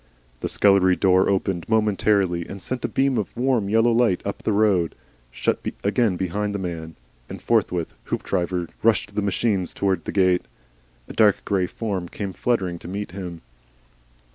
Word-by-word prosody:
The - - -3
scullery 95 -2 +4
door 95 0 +3
opened 95 -2 -1
momentarily 100 -5 +2
and 100 - -7
sent 125 +6 -4
a - - +1
beam 135 -3 +1
of 105 - -5
warm, 120 -5 +1
yellow 115 +2 +4
light 115 -5 +2
up 100 +2 -4
the 115 - 0
road, 100 -6 +2 0.3
shut - - -1 0.2
again 105 -2 +2
behind 100 +3 -2
the - - 0
man, 85 -4 -5 0.3
and - - -7
forthwith 95 -7 0
Hoopdriver 90 -1 -2
rushed 110 -2 +2
the 105 - 0
machines 100 -1 0
towards 95 -5 0
the - - -3
gate. 90 -2 +2 0.6
A - - -8
dark 105 -3 +3
grey 95 -3 +1
form 95 -4 -4
came 100 -2 -5
fluttering 95 -8 -1
to - - -10
meet 100 +1 -5
him. 90 -3 -7
100 Hz, 165 wpm, -23 LUFS, 90-110 Hz, 0.6 s, scullery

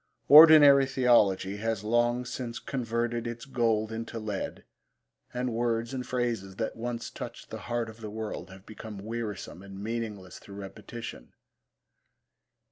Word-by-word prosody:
Ordinary 145 -2 +9
theology 105 -7 +3
has 110 -1 -2
long 120 +2 +1
since 120 -1 -5
converted 120 -2 -2
its 120 0 -6
gold 115 -4 0
into 115 +1 -5
lead, 105 -3 -4 0.7
and 125 -1 -2
words 115 +1 -1
and 125 -1 -4
phrases 115 -6 -2
that 110 +2 -3
once 120 0 -5
touched - - -9
the - - -5
heart 120 -1 -1
of 110 +1 -12
the 110 - -6
world 105 -4 -6
have 95 +1 -14
become 110 -1 -9
wearisome 110 -6 -5
and 100 0 -10
meaningless 105 -4 -5
through 100 - -12
repetition. 100 +4 -9
115 Hz, 135 wpm, -28 LUFS, 105-120 Hz, 0.7 s, Ordinary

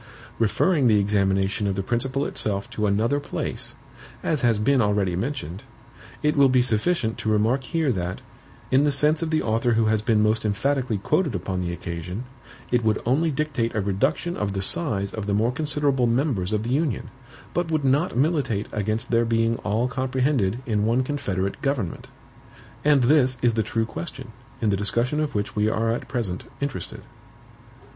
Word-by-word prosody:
Referring 125 - +3
the 105 -2 +5
examination 100 0 +1
of 100 - 0
the 95 - -2
principle 130 +6 -1
itself 100 0 -2
to 110 -3 -1
another 110 +8 +1
place, 145 - -5 0.5
as 155 -3 0
has 120 -4 +3
been 125 +5 +3
already 100 -4 +1
mentioned, 95 - -4 0.6
it 150 0 +2
will 140 -2 +5
be 125 -1 +4
sufficient 115 +1 +1
to 110 - -2
remark 110 +5 +2
here 160 -4 0
that, 90 -4 -3 0.5
in 135 +2 +5
the 145 - +3
sense 150 +3 +2
of 165 - -1
the 155 -1 +1
author 115 +2 +1
who 115 0 +2
has 110 -1 +2
been 110 -1 +2
most 110 +1 +1
emphatically 125 +3 0
quoted 150 - 0
upon 95 +1 -2
the 85 -1 -2
occasion, 85 +5 -5 0.5
it 120 -1 +2
would 110 -1 +2
only 145 +8 +2
dictate 140 -6 -1
a - - +1
reduction 135 - 0
of 100 -1 -2
the 95 - -2
SIZE 100 - -2
of 105 -2 -4
the 100 - +1
more 115 +4 +2
considerable 145 -3 0
MEMBERS 115 - 0
of 105 0 0
the 120 - -3
Union, 140 -6 -1 0.4
but 175 -1 -1
would 155 -3 0
not 140 +1 +2
militate 135 -8 +1
against 110 +2 -2
their 115 0 +4
being 115 0 +1
all 110 +4 0
comprehended 130 -3 0
in 105 -4 0
one 120 +4 +2
confederate 100 -9 -2
government. 130 - -2 0.8
And 145 -3 +4
this 130 -1 +4
is 120 -1 +4
the 110 - +1
true 115 +1 -1
question, 130 0 -7 0.3
in 105 - +3
the - - +2
discussion 120 +8 +1
of 155 -5 -2
which 105 +3 -2
we 105 0 +2
are 115 +1 0
at 115 - -3
present 110 -9 -3
interested. 140 -1 -4
115 Hz, 180 wpm, -24 LUFS, 105-140 Hz, 0.8 s, the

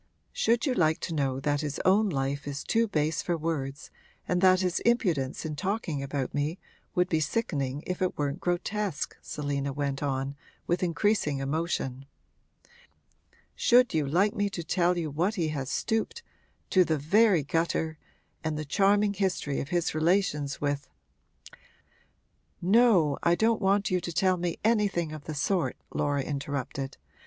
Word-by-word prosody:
'Should 230 +1 +2
you 265 - +1
like 160 -7 +2
to 170 - -4
know 135 -3 0
that 145 +1 0
his 145 -2 -3
own 205 +3 +4
life 140 -2 -2
is 140 -1 -4
too 230 0 +2
base 155 -4 0
for 175 -1 -1
words 150 -3 -4 0.4
and 180 0 +1
that 185 -1 +5
his 180 -1 0
impudence 175 - +1
in 155 -1 -3
talking 185 -4 -2
about 140 -1 -3
me 145 +4 -1 0.4
would 180 0 +3
be 160 -4 +1
sickening 145 - -1
if 180 0 -4
it 185 - 0
weren't 145 +2 -1
grotesque?' 180 -1 -2
Selina 140 -1 -3
went 140 0 -2
on, 135 -1 -2 0.3
with 175 +1 0
increasing 180 -3 +1
emotion. 135 -2 -2 1.5
'Should 250 +1 +4
you 155 -3 +1
like 190 +8 +2
me 205 -3 0
to 175 -4 -5
tell 175 +2 +1
you 165 -3 -2
to - - -9
what 175 +9 0
he 165 -5 0
has 140 -3 -3
stooped 225 - -1 0.5
to 185 - +6
the 160 -3 0
very 185 +3 +4
gutter 160 +1 -1 0.4
and 155 -1 -2
the 155 - -4
charming 200 +6 +3
history 190 -8 -1
of 140 - -4
his 175 -1 0
relations 155 -3 +1
with 145 0 -2 0.9
' - - -39
'No, 190 - +4
I 170 0 +3
don't 220 +2 +2
want 200 0 +2
you 180 -1 +1
to 170 - -4
tell 185 +2 +2
me 175 -1 -2
anything 205 -7 +1
of 155 -2 -8
the 155 - -5
sort,' 175 +5 0 0.2
Laura 145 -1 0
interrupted. 140 -1 -4
165 Hz, 165 wpm, -28 LUFS, 145-190 Hz, 1.5 s, to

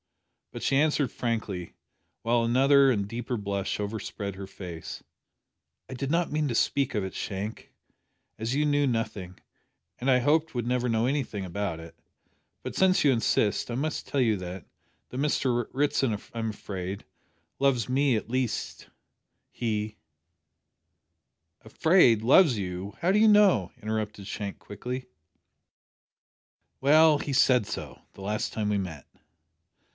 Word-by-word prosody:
But - - -7
she 135 - +2
answered 150 -3 +2
frankly, 110 -7 -3 0.5
while 115 0 +2
another 135 +3 +5
and 105 -5 0
a - - -10
deeper 120 +3 -4
blush 100 -1 -3
overspread 105 -1 -4
her 95 0 -7
face 90 -4 -8 0.9
"I - - -6
did 135 +1 -3
not 170 +1 +1
mean 150 0 0
to 120 - -2
speak 140 +3 +1
of 105 -2 0
it, 95 - -6
Shank, 100 +2 -5 0.7
as 115 +3 -2
you 150 +1 +2
knew 145 -1 +2
nothing, 105 -6 -3 0.6
and 130 - -1
I 130 - +6
had 125 - +1
hoped 155 +3 +2
would 120 -1 -2
never 125 0 0
know 115 0 +1
anything 125 -7 -2
about 90 -2 -3
it, 80 0 -11 0.7
but - - -6
since 190 -4 +3
you 140 - +6
insist, 115 -2 +1
I - - -2
must 150 +4 -3
tell 140 - -1
you 115 -4 +3
that 90 0 -7 0.4
that 125 - -6
Mr 130 -5 0
Ritson, 135 -5 +1 0.2
I'm 115 -1 -2
afraid, 95 -2 -6 0.5
loves 130 -5 +2
me 130 -1 +2
at 105 - -5
least 125 -1 -3 0.6
he 110 -2 -3 0.8
" 85 +2 -53
"Afraid! 120 - +4
loves 135 - +6
you! 95 +1 -5
How 180 +3 +2
do 210 - +4
you 220 - +6
know?" 205 - +5
interrupted 105 -2 -3
Shank 100 -2 -5
quickly. 125 +5 -6 1.8
"Well, 155 +2 +6
he 145 - -4
said 125 -4 +4
so - - -6
the - - -13
last 105 +2 -2
time 110 -2 -2
we 105 -1 +1
met." 80 -7 -6
115 Hz, 150 wpm, -27 LUFS, 100-140 Hz, 1.8 s, I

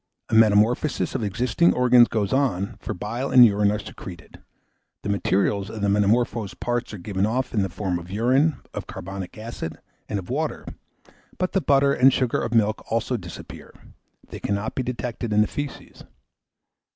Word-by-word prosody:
A - - -6
metamorphosis 110 +6 +3
of 130 - -2
existing 120 - +2
organs 125 -1 +6
goes 105 -1 -1
on, 110 -9 0
for - - -5
bile 120 +8 -4
and 125 -2 +8
urine 105 -2 +3
are 105 - -1
secreted; 90 -5 -10 0.6
the - - -3
materials 100 0 0
of 110 - -7
the 100 - +1
metamorphosed 105 +1 +1
parts 120 0 -2
are 105 - -7
given 95 +2 -1
off 125 +4 -2
in 105 - +2
the 95 - -1
form 90 0 -2
of 85 +1 -11
urine, 130 +9 +2 0.2
of - - -6
carbonic 95 +1 -7
acid, 110 -8 -6 0.3
and 105 - -1
of 95 -3 -6
water; - - -2 0.7
but 185 0 -1
the 195 - +1
butter 140 -2 +3
and 130 +1 +5
sugar 125 -3 0
of 115 - -3
milk 110 -2 +1
also 115 +2 0
disappear; 90 -7 -9 0.5
they - - -8
cannot 100 +2 -2
be - - -2
detected 120 -2 -4
in 105 0 +4
the 105 - +3
faeces. 145 -1 -7
110 Hz, 175 wpm, -24 LUFS, 100-125 Hz, 0.7 s, and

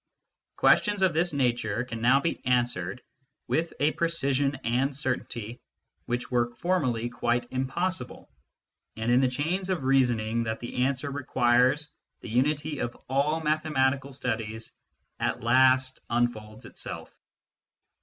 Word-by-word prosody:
Questions 205 -2 +3
of 185 -3 +4
this 170 +3 +1
nature 120 -5 0
can 115 -2 -6
now 130 +4 +5
be 165 +4 -2
answered 120 -4 0 0.4
with 165 +1 0
a 150 +2 +3
precision 140 -5 0
and 130 +4 0
certainty 120 -3 -3 0.5
which 120 +1 -3
were 120 -1 +1
formerly 130 -9 0
quite 120 0 -1
impossible; 170 +9 -2 0.7
and 115 +2 0
in 125 +2 +5
the 130 - +4
chains 165 +9 -2
of 180 -7 -1
reasoning 120 -4 +2
that 110 0 -3
the 125 +1 -1
answer 140 +1 -1
requires 130 +1 +2 0.3
the - - -8
unity 145 +5 0
of 120 - -3
all 145 +4 +1
mathematical 140 -3 +1
studies 115 -4 -4 0.5
at - - -1
last 130 +2 +4
unfolds 115 -1 -1
itself. - - -7
130 Hz, 125 wpm, -27 LUFS, 120-145 Hz, 0.7 s, now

